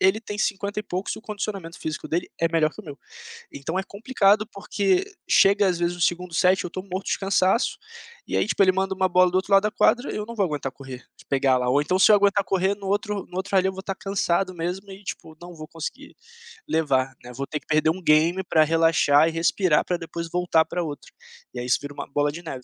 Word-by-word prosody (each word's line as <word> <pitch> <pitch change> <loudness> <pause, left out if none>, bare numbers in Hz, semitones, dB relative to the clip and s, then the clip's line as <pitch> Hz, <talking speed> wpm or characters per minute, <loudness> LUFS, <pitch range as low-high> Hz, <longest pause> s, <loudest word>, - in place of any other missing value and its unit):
ele 190 +3 +3
tem 205 -1 -6
50 205 0 -1
e - - -9
poucos 185 -1 -4
e - - -10
o - - -11
condicionamento 200 -5 -6
físico 155 -2 -5
dele 175 +2 -2
é 165 - +3
melhor 160 -2 +2
que - - -10
o - - -18
meu. 145 -3 -9 0.5
Então, 160 +6 -4
é 190 - 0
complicado 210 -1 +1
porque 200 - 0 0.2
chega 200 +1 +4
às 180 -2 0
vezes 175 0 -1
o - - -11
segundo 175 0 0
set, 185 +2 +3
eu 180 - -5
tô 185 +2 -6
morto 190 0 -6
de - - 0
cansaço, 195 +3 +1 0.5
e - - -1
aí - - +2
tipo, 205 - +2
ele 185 - +6
manda 190 +1 -1
uma 185 0 +1
bola 180 0 +4
do 185 - -1
outro 190 +1 -1
lado 195 0 +6
da 210 - 0
quadra, 245 +4 +2
eu 210 - -4
não 235 - -8
vou 200 -3 +1
aguentar 145 -5 -3
correr. 130 -2 -10 0.2
Pegar 135 -1 +2
lá, 125 0 0
ou 140 +3 +3
então, 180 +6 0
se 210 - +6
eu - - +8
aguentar 200 0 +2
correr 190 +1 +1
no 200 -1 -9
outro 205 0 -1
no 180 - -5
outro 195 +1 -1
rally 190 0 +4
eu - - -2
vou 190 - -7
estar 195 0 -4
cansado 195 -1 -1
mesmo 180 +4 -4
e 195 +1 -11
tipo, 160 -4 -7
não 175 0 -10
vou 155 -1 -9
conseguir 165 -1 -8 0.5
levar, 135 -5 0
né. 125 0 -11
Vou 140 +2 -4
ter 150 - -4
que - - -32
perder 155 0 +2
um 180 +4 -2
game 165 +3 +3
pra 160 -4 +3
relaxar 160 -2 +4
e 165 - -1
respirar, 165 0 +2
pra 180 - -2
depois 170 0 -6
voltar 175 -2 +2
para 175 +2 -4
outro, 150 -3 -7 0.4
e 125 - -6
aí 120 - -4
isso 125 - +2
vira 145 0 -7
uma 140 - -7
bola 145 +1 0
de 170 +3 -8
neve. 135 -6 -7
180 Hz, 250 wpm, -24 LUFS, 160-195 Hz, 0.5 s, eu